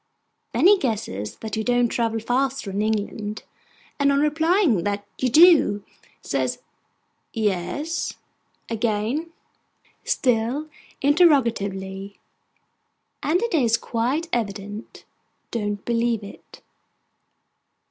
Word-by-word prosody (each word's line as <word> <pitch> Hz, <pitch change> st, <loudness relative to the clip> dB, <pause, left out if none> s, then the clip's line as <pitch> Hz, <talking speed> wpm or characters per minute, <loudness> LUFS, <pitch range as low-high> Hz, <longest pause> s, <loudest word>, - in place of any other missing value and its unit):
Then -, -, +1 dB
he 400 Hz, +1 st, +7 dB
guesses 105 Hz, -, -3 dB
that 220 Hz, -2 st, -4 dB
you 220 Hz, -, -1 dB
don't 245 Hz, +1 st, +2 dB
travel 225 Hz, -1 st, 0 dB
faster 255 Hz, 0 st, -1 dB
in 200 Hz, +2 st, -1 dB
England; 215 Hz, 0 st, -2 dB, 0.6 s
and 280 Hz, 0 st, +4 dB
on 280 Hz, -, +2 dB
your 300 Hz, +2 st, +3 dB
replying 320 Hz, -, +2 dB
that 205 Hz, 0 st, -2 dB
you 255 Hz, -, +1 dB
do, 305 Hz, -, +6 dB, 0.4 s
says -, -, -1 dB, 0.8 s
'Yes?' 215 Hz, -, -2 dB, 0.5 s
again 230 Hz, +8 st, -1 dB, 0.7 s
(still 250 Hz, +5 st, 0 dB, 0.3 s
interrogatively), 205 Hz, -, +2 dB, 1.0 s
and 350 Hz, +8 st, +1 dB
it 470 Hz, -, -2 dB
is 235 Hz, -8 st, +3 dB
quite 255 Hz, +8 st, -1 dB
evident, 205 Hz, -1 st, -4 dB, 0.5 s
don't 205 Hz, -3 st, -3 dB
believe 235 Hz, -2 st, 0 dB
it. 200 Hz, -, -13 dB
230 Hz, 100 wpm, -23 LUFS, 205-285 Hz, 1.0 s, he